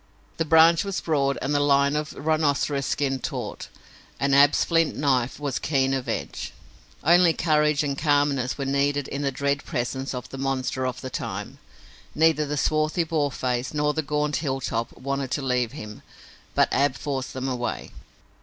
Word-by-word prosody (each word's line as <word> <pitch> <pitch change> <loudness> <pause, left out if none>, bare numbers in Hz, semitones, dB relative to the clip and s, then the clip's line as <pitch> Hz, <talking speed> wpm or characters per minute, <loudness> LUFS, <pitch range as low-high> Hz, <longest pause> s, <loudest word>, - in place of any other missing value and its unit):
The 165 - 0
branch 160 +1 +6
was 195 -2 -3
broad 140 -4 0
and 140 - -1
the 145 - +3
line 140 0 +3
of 150 0 -2
rhinoceros 145 -2 0
skin 135 -2 0
taut, - - -5 0.5
and 140 0 +1
Ab's 145 +1 +5
flint 165 -2 +2
knife 130 -3 0
was 140 -3 -2
keen 135 -3 +1
of 130 -2 -3
edge. - - -4 0.5
Only 170 +1 +5
courage 150 -3 +2
and 140 -2 -1
calmness 145 -3 +1
were 140 - -3
needed 140 +1 0
in 140 - -4
the 140 -1 0
dread 140 +2 -1
presence 130 +2 -3
of 125 - -6
the 135 - -8
monster 130 -1 -1
of 125 - -5
the 130 - -6
time. - - -5 0.6
Neither 155 -1 +3
the 150 +1 -2
swarthy 155 +3 +1
Boarface 140 -5 -1
nor 150 0 +1
the 160 - 0
gaunt 150 0 -1
Hilltop 130 -5 -2
wanted 140 0 -3
to 140 - -2
leave 125 -3 0
him, 105 -1 -9 0.5
but - - +4
Ab 140 -1 +2
forced 135 -2 -4
them 130 0 -4
away. 125 -2 -3
140 Hz, 170 wpm, -25 LUFS, 135-150 Hz, 0.6 s, branch